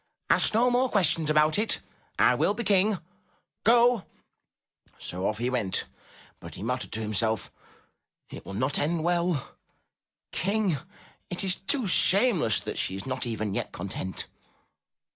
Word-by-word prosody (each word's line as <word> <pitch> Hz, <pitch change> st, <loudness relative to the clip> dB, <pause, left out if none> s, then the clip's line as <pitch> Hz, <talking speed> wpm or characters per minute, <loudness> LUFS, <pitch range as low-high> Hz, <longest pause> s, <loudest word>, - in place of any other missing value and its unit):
' -, -, -54 dB
' -, -, -46 dB
Ask -, -, +3 dB
no 245 Hz, +2 st, +4 dB
more 250 Hz, +1 st, +2 dB
questions 165 Hz, -7 st, +2 dB
about 155 Hz, +3 st, +4 dB
it! 220 Hz, -, +2 dB, 0.4 s
I -, -, +5 dB
will 205 Hz, -, +1 dB
be 235 Hz, -, -3 dB
King. 200 Hz, 0 st, +3 dB, 0.7 s
Go 235 Hz, -1 st, +5 dB, 0.5 s
!" -, -, -65 dB, 0.2 s
So 90 Hz, +2 st, -3 dB
off 105 Hz, -, -1 dB
he 120 Hz, +3 st, -1 dB
went 110 Hz, -7 st, -1 dB, 0.5 s
but -, -, -10 dB
he -, -, -7 dB
muttered 125 Hz, +3 st, -3 dB
to 110 Hz, -, -2 dB
himself, 110 Hz, 0 st, -1 dB, 0.8 s
''It -, -, -8 dB
will 95 Hz, -, -8 dB
not 130 Hz, +6 st, 0 dB
end 160 Hz, +2 st, 0 dB
well! 175 Hz, -4 st, 0 dB, 0.8 s
King! 195 Hz, -6 st, 0 dB, 0.5 s
It 180 Hz, +1 st, -2 dB
is 190 Hz, -2 st, +1 dB
too 240 Hz, +6 st, 0 dB
shameless 190 Hz, -, +3 dB
that -, -, -5 dB
she 95 Hz, -, -1 dB
is 95 Hz, -, -6 dB
not 130 Hz, -1 st, -3 dB
even 110 Hz, -3 st, -3 dB
yet -, -, -3 dB
content." 95 Hz, 0 st, -5 dB
155 Hz, 160 wpm, -27 LUFS, -, 0.8 s, I